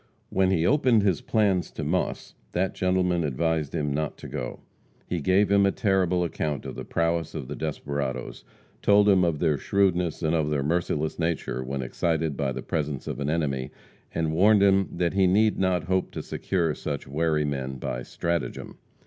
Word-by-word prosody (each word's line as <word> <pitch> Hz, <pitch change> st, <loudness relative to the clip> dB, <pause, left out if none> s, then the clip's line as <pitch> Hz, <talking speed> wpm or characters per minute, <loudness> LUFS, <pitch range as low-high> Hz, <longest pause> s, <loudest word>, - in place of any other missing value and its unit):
When 95 Hz, -1 st, +2 dB
he 85 Hz, -3 st, +2 dB
opened 125 Hz, -4 st, +4 dB
his 95 Hz, -7 st, +1 dB
plans 100 Hz, -5 st, +1 dB
to -, -, -5 dB
Moss, -, -, -2 dB, 0.2 s
that 95 Hz, +2 st, 0 dB
gentleman 90 Hz, -2 st, +1 dB
advised 80 Hz, +2 st, -1 dB
him 75 Hz, -3 st, -1 dB
not 75 Hz, +1 st, -2 dB
to -, -, -9 dB
go. -, -, -5 dB, 0.4 s
He 90 Hz, -3 st, -3 dB
gave 95 Hz, +5 st, +3 dB
him 100 Hz, 0 st, +5 dB
a 100 Hz, -, +4 dB
terrible 95 Hz, -4 st, +1 dB
account 75 Hz, -4 st, -3 dB
of -, -, -5 dB
the -, -, -6 dB
prowess 85 Hz, -1 st, -1 dB
of -, -, -5 dB
the -, -, -5 dB
desperadoes; 70 Hz, -5 st, -4 dB, 0.4 s
told 105 Hz, 0 st, +5 dB
him 95 Hz, -3 st, +5 dB
of 85 Hz, -3 st, +1 dB
their 75 Hz, -3 st, +1 dB
shrewdness 90 Hz, -3 st, +1 dB
and 80 Hz, 0 st, +1 dB
of 80 Hz, -2 st, +1 dB
their 75 Hz, -2 st, 0 dB
merciless 80 Hz, 0 st, -1 dB
nature 80 Hz, -6 st, -1 dB
when 65 Hz, +1 st, -3 dB
excited 80 Hz, +3 st, -1 dB
by 70 Hz, -2 st, -1 dB
the 65 Hz, 0 st, -5 dB
presence 75 Hz, -4 st, -3 dB
of -, -, -4 dB
an 70 Hz, 0 st, -1 dB
enemy, 70 Hz, -5 st, -1 dB, 0.4 s
and 80 Hz, -1 st, -1 dB
warned 100 Hz, +4 st, +5 dB
him 95 Hz, -1 st, +4 dB
that 85 Hz, -1 st, -1 dB
he 95 Hz, -1 st, +4 dB
need 105 Hz, +4 st, +3 dB
not 95 Hz, -3 st, +1 dB
hope 95 Hz, +2 st, 0 dB
to -, -, -5 dB
secure 85 Hz, -5 st, -1 dB
such 75 Hz, -2 st, -4 dB
wary 75 Hz, +1 st, +1 dB
men 65 Hz, -2 st, -3 dB
by -, -, -4 dB
stratagem. 85 Hz, +6 st, -3 dB
85 Hz, 185 wpm, -26 LUFS, 75-95 Hz, 0.4 s, him